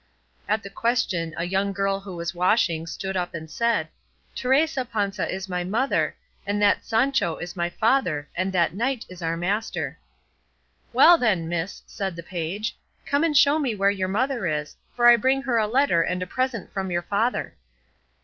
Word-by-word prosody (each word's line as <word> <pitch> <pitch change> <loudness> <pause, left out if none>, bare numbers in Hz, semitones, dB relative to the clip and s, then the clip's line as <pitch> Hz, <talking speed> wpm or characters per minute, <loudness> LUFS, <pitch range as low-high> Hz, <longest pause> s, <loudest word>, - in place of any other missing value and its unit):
At 215 +1 +1
the 195 - -8
question 190 -10 -1
a 170 - -1
young 195 +2 0
girl 195 0 0
who 195 -2 -9
was 170 +1 -4
washing 175 -2 +1
stood 190 +4 -4
up 180 -2 -2
and 160 -1 -7
said, 235 +6 +1 0.5
"Teresa 265 +2 +1
Panza 205 -4 -2
is 190 +1 -4
my 180 -1 -2
mother, 225 +9 0 0.3
and 205 +1 -1
that 205 0 +3
Sancho 230 -6 +1
is 175 +1 -7
my 175 -1 -1
father, 175 - +1
and 185 +2 -1
that 170 -3 +2
knight 240 +4 -1
is 185 -1 -11
our 165 0 -1
master." 200 +6 -2 0.9
"Well 345 -1 +7
then, 190 -9 +1
miss," 170 +2 -3
said 195 -4 -4
the 170 - -7
page, 180 +5 -4 0.3
"come 285 +2 +1
and 310 -3 +2
show 290 +2 +5
me 260 -7 -1
where 200 0 +3
your 190 -2 -2
mother 235 +1 0
is, 150 -1 -3 0.2
for 240 - +2
I 240 0 +9
bring 265 +4 +1
her 245 -4 +1
a 215 - +1
letter 245 -7 +3
and 180 +2 -1
a - - -4
present 255 +2 -3
from 190 -1 -2
your 175 -1 -1
father." 210 +7 -1
195 Hz, 185 wpm, -24 LUFS, 175-235 Hz, 0.9 s, I